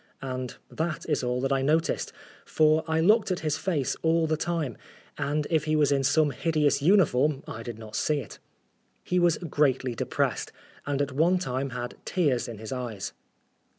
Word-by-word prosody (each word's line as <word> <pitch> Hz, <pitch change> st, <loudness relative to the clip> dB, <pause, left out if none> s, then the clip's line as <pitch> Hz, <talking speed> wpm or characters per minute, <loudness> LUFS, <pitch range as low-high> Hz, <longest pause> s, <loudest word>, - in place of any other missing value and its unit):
And 130 Hz, -1 st, -4 dB, 0.2 s
that 160 Hz, -1 st, -3 dB
is 150 Hz, -4 st, 0 dB
all 125 Hz, 0 st, 0 dB
that 135 Hz, +1 st, +1 dB
I 135 Hz, -, +1 dB
noticed, 155 Hz, +4 st, +1 dB, 0.3 s
for 155 Hz, 0 st, +3 dB
I 160 Hz, 0 st, +1 dB
looked 210 Hz, +6 st, +4 dB
at 185 Hz, -, -1 dB
his 155 Hz, -2 st, 0 dB
face 155 Hz, -9 st, -1 dB
all 165 Hz, 0 st, +3 dB
the 155 Hz, 0 st, +1 dB
time, 160 Hz, -6 st, -2 dB, 0.4 s
and 150 Hz, +1 st, -1 dB
if 155 Hz, -2 st, +2 dB
he 155 Hz, 0 st, +1 dB
was 150 Hz, -2 st, +3 dB
in 135 Hz, -1 st, +2 dB
some 150 Hz, +2 st, +3 dB
hideous 150 Hz, -3 st, +1 dB
uniform 150 Hz, -5 st, +3 dB
I 110 Hz, -, -6 dB
did 115 Hz, -1 st, -7 dB
not 110 Hz, -1 st, -9 dB
see 150 Hz, -, +1 dB
it. -, -, -9 dB, 0.6 s
He 180 Hz, -, +1 dB
was 175 Hz, -2 st, +3 dB
greatly 140 Hz, -6 st, +1 dB
depressed, 115 Hz, -, -1 dB, 0.4 s
and 145 Hz, 0 st, +1 dB
at 140 Hz, -, -4 dB
one 165 Hz, +7 st, +3 dB
time 135 Hz, -5 st, -2 dB
had 120 Hz, -1 st, -5 dB
tears 145 Hz, -9 st, 0 dB
in 115 Hz, -2 st, -7 dB
his 110 Hz, +1 st, -8 dB
eyes. 120 Hz, -6 st, -4 dB
145 Hz, 185 wpm, -27 LUFS, 130-160 Hz, 0.6 s, looked